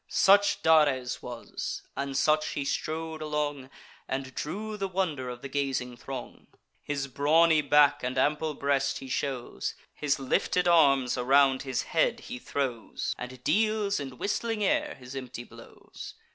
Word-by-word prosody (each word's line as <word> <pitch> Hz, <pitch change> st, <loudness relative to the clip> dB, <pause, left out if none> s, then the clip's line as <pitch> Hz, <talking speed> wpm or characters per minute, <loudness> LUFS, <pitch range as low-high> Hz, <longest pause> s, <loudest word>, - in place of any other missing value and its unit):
Such 200 Hz, +1 st, +4 dB
Dares 145 Hz, -6 st, +3 dB
was; 120 Hz, -1 st, -6 dB
and 140 Hz, 0 st, -3 dB
such 155 Hz, +1 st, +2 dB
he 140 Hz, -, -3 dB
strode 160 Hz, +2 st, -3 dB
along, 145 Hz, -3 st, -2 dB, 0.4 s
And 130 Hz, -1 st, -4 dB
drew 210 Hz, -, -4 dB
the 195 Hz, -2 st, -2 dB
wonder 170 Hz, -9 st, -2 dB
of 125 Hz, 0 st, -8 dB
the -, -, -4 dB
gazing 135 Hz, -3 st, -2 dB
throng. 130 Hz, +1 st, -8 dB, 0.3 s
His 140 Hz, -2 st, -3 dB
brawny 155 Hz, +4 st, +4 dB
back 145 Hz, 0 st, +4 dB
and 125 Hz, +1 st, -3 dB
ample 150 Hz, +3 st, +1 dB
breast 140 Hz, -1 st, 0 dB
he 135 Hz, -, -8 dB
shows, 130 Hz, -1 st, -3 dB, 0.2 s
His 145 Hz, -2 st, 0 dB
lifted 175 Hz, +6 st, +1 dB
arms 140 Hz, -7 st, +4 dB
around 135 Hz, +1 st, +4 dB
his 130 Hz, -2 st, -2 dB
head 225 Hz, +8 st, +1 dB
he 250 Hz, +2 st, -7 dB
throws, 130 Hz, -, -3 dB
And 125 Hz, 0 st, -8 dB
deals 210 Hz, +2 st, +1 dB
in 135 Hz, -3 st, -7 dB
whistling 215 Hz, -, -1 dB
air 195 Hz, -, +1 dB
his 125 Hz, +1 st, -11 dB
empty 130 Hz, -2 st, -6 dB
blows. -, -, -12 dB
140 Hz, 145 wpm, -28 LUFS, 130-160 Hz, 0.4 s, Such